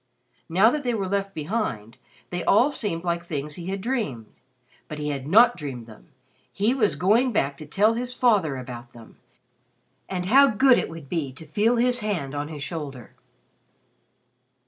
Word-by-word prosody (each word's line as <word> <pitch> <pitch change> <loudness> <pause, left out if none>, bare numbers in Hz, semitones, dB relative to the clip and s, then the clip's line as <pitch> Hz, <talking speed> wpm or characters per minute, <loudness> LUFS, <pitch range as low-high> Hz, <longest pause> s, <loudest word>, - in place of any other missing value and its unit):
Now 195 +7 +5
that 300 +1 -2
they 245 -2 0
were 195 -3 -2
left 195 0 -2
behind, 150 - -3 0.3
they 175 -1 -3
all 245 +8 +4
seemed 190 -11 -2
like 170 -1 -1
things 150 -3 -4
he 170 +2 -7
had 195 0 -3
dreamed. 210 - -2 0.6
But 155 - -7
he 150 0 -3
had 140 -2 -4
not 230 +8 +6
dreamed 135 -7 -7
them; 110 -2 -16 0.4
he 210 +5 +1
was 225 -6 +1
going 230 +8 +3
back 140 -9 0
to 155 - -10
tell 205 +8 +3
his 245 +2 -3
father 205 - +2
about 120 -2 -9
them. 115 -2 -15 0.9
And 180 -2 -3
how 275 +8 +6
good 255 +2 +4
it - - -3
would 165 -3 -10
be 150 -3 -3
to 160 +5 -12
feel 210 +10 +1
his 245 +1 +3
hand 185 - -3
on 145 0 -3
his 150 -2 -6
shoulder! 145 -7 -6
180 Hz, 175 wpm, -24 LUFS, 145-225 Hz, 0.9 s, not